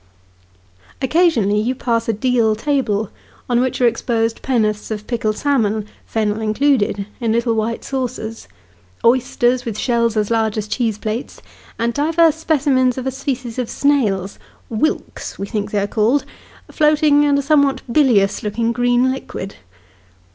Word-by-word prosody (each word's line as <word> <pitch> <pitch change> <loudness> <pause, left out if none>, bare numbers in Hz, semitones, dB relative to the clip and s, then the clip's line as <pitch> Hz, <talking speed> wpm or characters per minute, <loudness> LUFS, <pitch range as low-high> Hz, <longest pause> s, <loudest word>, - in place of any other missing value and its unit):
Occasionally 265 - +2
you 250 +4 -1
pass 230 -2 -1
a - - +2
deal 230 -1 +1
table, 220 -5 -1 0.4
on 240 -1 +2
which 260 0 -1
are 250 - +3
exposed 230 -1 0
pen'orths 215 -5 0
of 215 -1 -5
pickled 215 -3 -1
salmon 220 -7 0 0.2
(fennel 215 -1 -1
included), 215 -3 +1
in 230 -2 0
little 235 +1 +1
white 225 +1 -2
saucers: 250 -4 -4 0.6
oysters, 245 0 +2
with 225 -4 -4
shells 235 -2 +1
as 210 +1 0
large 220 -1 +1
as 215 -1 -2
cheese 220 -1 -1
plates, 220 +4 -5 0.4
and 235 +1 0
divers 320 +3 +3
specimens 275 -5 +1
of 260 - -4
a 265 - 0
species 255 -3 -4
of 245 - -2
snail 220 -10 +1 0.4
(wilks, 235 +8 -2
we 195 - -4
think 205 -1 -3
they 210 - -2
are 200 - 0
called), 225 +7 +1 0.5
floating 300 -1 +4
in 285 -1 +3
a 280 - 0
somewhat 280 -2 +2
bilious 230 -10 +3
looking 225 +2 -1
green 245 +1 +2
liquid. 200 -7 -6
235 Hz, 145 wpm, -19 LUFS, 215-265 Hz, 0.6 s, floating